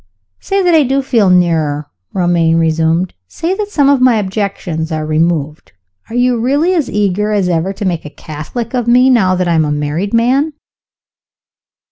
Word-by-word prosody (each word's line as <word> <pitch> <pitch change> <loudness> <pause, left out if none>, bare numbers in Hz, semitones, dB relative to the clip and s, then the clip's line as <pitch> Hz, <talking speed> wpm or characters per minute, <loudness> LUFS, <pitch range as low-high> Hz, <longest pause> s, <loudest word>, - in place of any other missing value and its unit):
"Say 390 0 -1
that 355 -1 +3
I 320 - +5
do 270 0 0
feel 230 -7 +2
nearer," 160 -5 +1 0.3
Romayne 170 -3 +1
resumed 165 +2 +1
"say 330 - -3
that 415 +1 -3
some 290 -9 +2
of 280 -2 +3
my 255 -2 +4
objections 190 -5 -3
are 155 -1 -2
removed 155 - -1 0.4
are 230 - -7
you 245 -1 +2
really 285 +9 +1
as 320 -7 0
eager 210 0 0
as 200 -3 +1
ever 175 +2 0
to 205 +1 -5
make 175 -3 -1
a 150 - -8
Catholic 155 - -7
of 245 -2 -1
me, 250 +2 +5
now 190 -7 +3
that 180 0 -1
I 170 - +1
am 160 -1 +3
a 150 - -1
married 150 +7 -2
man?" 265 +7 +1
195 Hz, 180 wpm, -14 LUFS, 165-250 Hz, 0.4 s, I